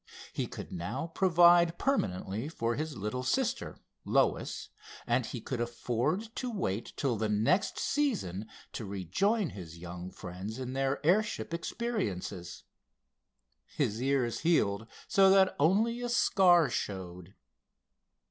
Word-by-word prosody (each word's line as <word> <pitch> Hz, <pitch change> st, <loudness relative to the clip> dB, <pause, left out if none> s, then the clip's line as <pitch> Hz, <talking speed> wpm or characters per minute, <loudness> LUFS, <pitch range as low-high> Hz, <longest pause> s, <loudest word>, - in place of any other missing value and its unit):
He -, -, -2 dB
could -, -, -8 dB
now 115 Hz, -, -4 dB
provide 175 Hz, -2 st, +5 dB
permanently 110 Hz, -, -1 dB
for 115 Hz, -7 st, -1 dB
his 155 Hz, 0 st, -4 dB
little 105 Hz, +5 st, -3 dB
sister, 255 Hz, -, -1 dB, 0.3 s
Lois, -, -, 0 dB, 0.4 s
and -, -, +1 dB
he -, -, -5 dB
could 125 Hz, -3 st, -4 dB
afford 125 Hz, -, -2 dB
to 250 Hz, -, -2 dB
wait 120 Hz, -, -2 dB
till 130 Hz, -6 st, 0 dB
the 110 Hz, 0 st, -1 dB
next 115 Hz, -, +2 dB
season 190 Hz, -, -1 dB, 0.3 s
to -, -, -4 dB
rejoin 145 Hz, -, 0 dB
his 85 Hz, -4 st, -9 dB
young 90 Hz, +1 st, -7 dB
friends 95 Hz, +5 st, -7 dB
in 130 Hz, 0 st, -5 dB
their 135 Hz, +1 st, -1 dB
airship 200 Hz, 0 st, +1 dB
experiences. 170 Hz, -, -3 dB, 1.0 s
His 110 Hz, +3 st, -1 dB
ears 130 Hz, -3 st, +1 dB
healed 110 Hz, -10 st, +1 dB, 0.2 s
so 195 Hz, -1 st, +5 dB
that 190 Hz, -1 st, +5 dB
only 215 Hz, +10 st, +3 dB
a 245 Hz, -, -2 dB
scar 180 Hz, -, +5 dB
showed. 90 Hz, -3 st, -5 dB
135 Hz, 125 wpm, -31 LUFS, -, 1.0 s, provide